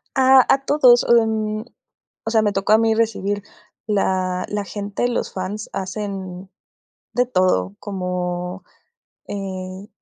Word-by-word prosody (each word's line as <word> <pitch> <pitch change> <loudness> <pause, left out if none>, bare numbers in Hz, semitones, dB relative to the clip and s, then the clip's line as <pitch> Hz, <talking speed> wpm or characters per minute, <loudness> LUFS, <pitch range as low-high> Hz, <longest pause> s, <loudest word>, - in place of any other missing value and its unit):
Ah, 265 -1 +7
a 270 0 +3
todos, 255 -5 +5
mm, 220 -2 +2 0.6
o - - -1
sea, 220 - +4
me 210 -1 +1
tocó 195 +1 +1
a 220 - +8
mí 225 0 +2
recibir 205 -3 0 0.4
la 185 -3 0
la 205 -1 -2
gente, 205 +4 -3
los 245 - -2
fans 195 +3 -5
hacen 190 -1 -5 0.6
de 245 - +2
todo, 185 - +1
como, 180 -1 -4 0.6
eh, 190 0 -6
205 Hz, 125 wpm, -21 LUFS, 185-220 Hz, 0.6 s, a